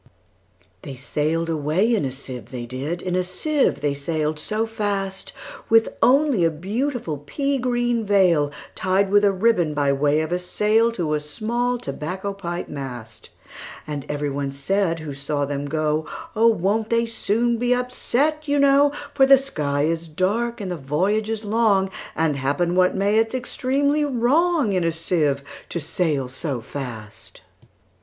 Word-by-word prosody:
They 135 - -8
sail'd 155 +5 -1
away 165 +8 +1
in 210 -10 +1
a 130 - -2
sieve, 130 -4 -8
they 125 -2 -6
did, 140 +8 -4
In 180 -1 -1
a 185 - +2
sieve 275 +12 0
they 145 -1 +1
sail'd 155 +1 -2
so 215 +8 -1
fast, 200 -3 -3 0.4
With 225 0 +5
only 270 - +4
a 165 - +4
beautiful 195 - -3
pea 275 - -1
green 240 -2 0
veilTied 185 0 +1
with 205 0 +5
a 200 - +5
ribbon, 185 -6 +2
by 140 -1 +2
way 145 +2 +2
of 160 +1 -4
a 180 - +1
sail, 215 +5 +2
To 170 -8 -1
a 150 - +1
small 235 +11 -1
tobacco 185 - -4
pipe 175 -3 -5
mast. 125 -6 -8 0.6
And 145 -3 -5
every 145 -1 -2
one 140 0 -2
said 165 +4 0
who 150 -2 -6
saw 140 +1 -2
them 145 0 -3
go,"Oh! 155 +8 0
won't 215 +1 +1
they 230 0 +3
be 230 - -5
soon 230 +2 0
upset, 250 +4 0
you 285 0 +2
know:For 280 0 +3
the 275 0 +8
sky 150 - -1
is 165 +1 -1
dark, 220 +9 -1
and 195 -3 -4
the 175 - -3
voyage 185 +10 0
is 225 -1 -3
long; 205 -3 +2 0.2
And, 155 -3 +1
happen 145 +6 0
what 185 0 +3
may, 200 +3 +2
it 225 +1 0
's - - -1
extremely 275 +4 0
wrongIn 270 - +2
a 165 - +2
sieve 155 -4 0 0.3
to 170 - -3
sail 150 -4 -1
so 135 0 -3
fast." 115 -4 -8
180 Hz, 160 wpm, -22 LUFS, 150-230 Hz, 0.6 s, the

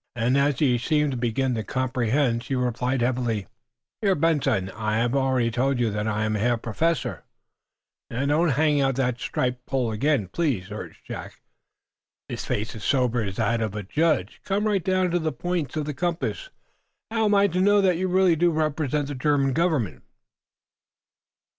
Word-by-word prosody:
Then, 120 +2 +1
as 140 -1 +2
he 125 -4 +2
seemed 150 +2 +1
to - - -3
begin 125 +2 0
to 110 -2 -2
comprehend, 125 0 0
he 125 +3 -3
replied, 125 +1 0
heavily: 120 -4 0 0.6
"Herr 200 -3 +3
Benson, 145 - +1
I 110 +1 -2
have 120 +3 +1
already 130 -3 +1
told 130 +2 0
you 115 -3 +1
that 105 +1 -2
I 110 0 0
am 110 0 0
Herr 115 +3 +1
Professor 125 +3 -1 0.4
" - - -65
"Now, 125 +4 -2
don't 155 +4 +2
hang 150 +1 +2
out 135 -1 +1
the 125 -2 0
striped 125 0 -2
pole 130 -4 0
again, 115 -1 +1
please," 110 - -2
urged 105 - -8
Jack, - - -8 0.9
his - - -5
face 105 +2 -3
as 105 - -8
sober 125 -2 +1
as 100 -3 -4
that 115 +1 0
of 110 -2 -2
a 105 - -4
judge. 150 - 0
"Come 205 +2 0
right 200 -4 +1
down 185 -1 +1
to 175 - +2
the 160 -1 -1
points 160 0 -3
of 150 - -1
the 150 - -3
compass. 175 - -2 0.6
How 225 -1 +1
am 205 -1 +3
I 200 0 +5
to 180 +2 0
know 205 +1 +5
that 185 -3 +3
you 185 +2 0
really 185 -1 +4
do 175 +2 +3
represent 150 -2 0
the - - -3
German 140 0 +1
government?" 130 - 0
135 Hz, 185 wpm, -25 LUFS, 115-160 Hz, 0.9 s, I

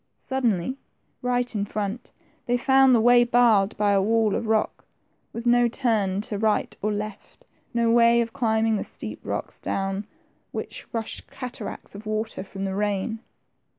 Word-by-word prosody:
Suddenly, 255 -2 -1 0.4
right 245 0 0
in 205 -2 -1
front, 210 +3 -4 0.4
they 245 0 +2
found 265 +1 +5
the - - +4
way 240 +1 +6
barred 235 -4 +3
by 205 -1 +2
a 195 -1 +4
wall 220 0 +2
of 225 - -2
rock, 220 -1 0 0.5
with 230 +1 -6
no 240 0 +5
turn 215 -6 0
to - - -12
the 205 - -2
right 220 -1 +1
or 210 - 0
left; 210 0 -6 0.3
no 235 -1 +2
way 235 0 +5
of 230 -1 -1
climbing 225 -4 +1
the - - -2
steep - - -5
rocks, - - -4
down 195 +1 -2 0.4
which - - -7
rushed 225 -2 -5
cataracts 245 -5 -7
of 205 +2 -9
water 215 -2 -3
from 195 0 -6
the 190 - -2
rain. 205 +2 -1
220 Hz, 165 wpm, -25 LUFS, 205-240 Hz, 0.5 s, way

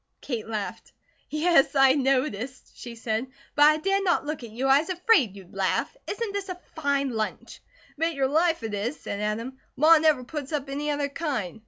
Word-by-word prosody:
Kate 235 -6 -4
laughed. 215 -3 -5 0.4
"Yes, 305 -2 +3
I 270 -1 +6
noticed," 260 -3 -1
she 240 -1 -9
said, 225 +2 -2 0.3
"but 290 - +6
I 305 - +3
dared 390 +5 0
not 350 -5 +1
look 300 -3 -4
at 235 - -8
you. 240 +5 -4
I 270 +1 +6
was 320 - -5
afraid 355 - +3
you'd 190 -3 -13
laugh. 195 - -1
Isn't 425 -1 -3
this 400 -1 -4
a 360 -1 -5 0.2
fine 280 -3 0
lunch?" 220 -2 -4 0.4
"Bet 330 0 0
your 270 -1 +1
life 320 0 +1
it 220 -2 -4
is," 220 +8 -3
said 200 - -5
Adam. 230 +5 -3 0.2
"Ma 310 +4 +6
never 305 -5 +3
puts 285 +2 -6
up 285 -2 -2
any 295 +2 -2
other 290 -1 0
kind." 275 - -3
275 Hz, 195 wpm, -26 LUFS, 235-315 Hz, 0.4 s, I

